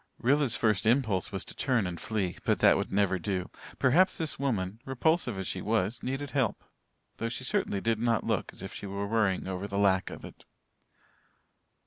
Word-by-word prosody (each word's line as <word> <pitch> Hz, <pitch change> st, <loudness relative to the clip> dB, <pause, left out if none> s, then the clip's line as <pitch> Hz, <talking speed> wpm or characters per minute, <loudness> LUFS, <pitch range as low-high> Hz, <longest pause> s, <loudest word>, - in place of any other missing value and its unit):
Rilla's 135 Hz, -1 st, +2 dB
first 105 Hz, -2 st, +1 dB
impulse 110 Hz, -6 st, +2 dB
was 95 Hz, -, -4 dB
to -, -, -10 dB
turn 125 Hz, -7 st, +1 dB
and 90 Hz, -2 st, -5 dB
flee. 100 Hz, -6 st, -2 dB
But -, -, +2 dB
that -, -, +6 dB
would -, -, -2 dB
never 95 Hz, -2 st, +2 dB
do. 90 Hz, 0 st, -3 dB, 0.3 s
Perhaps 175 Hz, +9 st, +4 dB
this 160 Hz, -4 st, -3 dB
woman, 110 Hz, -7 st, -1 dB
repulsive 135 Hz, -, +1 dB
as 95 Hz, -, -3 dB
she 90 Hz, -, -3 dB
was, 110 Hz, +1 st, 0 dB
needed 135 Hz, +3 st, -3 dB
help 135 Hz, -7 st, 0 dB, 0.5 s
though 115 Hz, -, -2 dB
she 120 Hz, +2 st, -4 dB
certainly 130 Hz, -, 0 dB
did 115 Hz, -1 st, +1 dB
not 115 Hz, -2 st, +1 dB
look -, -, -1 dB
as -, -, -7 dB
if -, -, -7 dB
she 100 Hz, -, -6 dB
were 100 Hz, +1 st, -3 dB
worrying 100 Hz, -4 st, +1 dB
over 95 Hz, +1 st, -3 dB
the 100 Hz, 0 st, -4 dB
lack 95 Hz, -2 st, +3 dB
of -, -, -9 dB
it. -, -, -13 dB
110 Hz, 190 wpm, -29 LUFS, 95-130 Hz, 0.5 s, that